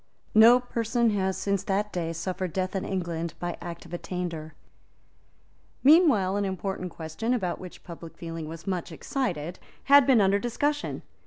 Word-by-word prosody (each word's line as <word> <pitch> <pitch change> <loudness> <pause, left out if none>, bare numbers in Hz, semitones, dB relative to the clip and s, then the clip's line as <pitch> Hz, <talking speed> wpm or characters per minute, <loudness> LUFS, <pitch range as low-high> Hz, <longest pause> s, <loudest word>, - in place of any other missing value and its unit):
No 230 +3 +8
person 235 -1 0
has, 190 -2 0
since 200 0 0
that 205 +2 -1
day, 165 -2 -2
suffered 180 +1 -3
death 185 +1 -2
in 190 - -1
England 170 -3 -3
by 175 0 -3
Act 170 -1 -7
of 170 - -12
Attainder. 170 -3 -5 1.3
Meanwhile 260 - +5
an 205 - 0
important 190 -1 -3
question, 165 +10 -2
about 185 -7 -2
which 180 -1 -10
public 165 -1 -10
feeling 165 -2 -6
was 165 0 -9
much 185 -3 -3
excited, 175 - -3 0.2
had 280 -2 +7
been 260 -4 +6
under 200 0 +4
discussion. 290 +6 -2
190 Hz, 155 wpm, -27 LUFS, 170-225 Hz, 1.3 s, No